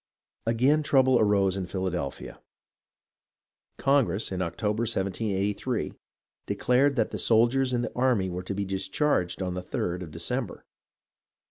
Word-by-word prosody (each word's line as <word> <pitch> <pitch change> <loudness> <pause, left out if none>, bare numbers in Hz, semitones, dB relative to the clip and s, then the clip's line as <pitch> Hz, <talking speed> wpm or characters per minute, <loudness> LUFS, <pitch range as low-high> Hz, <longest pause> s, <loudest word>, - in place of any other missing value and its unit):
Again 130 +7 +3
trouble 130 -4 +4
arose 100 -3 +3
in 95 -2 -3
Philadelphia. 90 -7 -4 1.4
Congress, 120 -9 +1
in 95 -1 -2
Octo 105 +4 -1
ber, 110 - -3
1783, 105 +1 -1 0.5
declared 135 +3 +2
that 120 - 0
the - - -4
soldiers 120 +4 +3
in 120 -1 0
the - - -4
army 125 -7 +2
were 90 0 -4
to 95 +2 -5
be 100 0 -2
discharged 95 - 0
on 90 -1 -2
the 90 - -4
3d 90 0 -3
of 90 - -7
December. - - -4
105 Hz, 135 wpm, -27 LUFS, 95-125 Hz, 1.4 s, trouble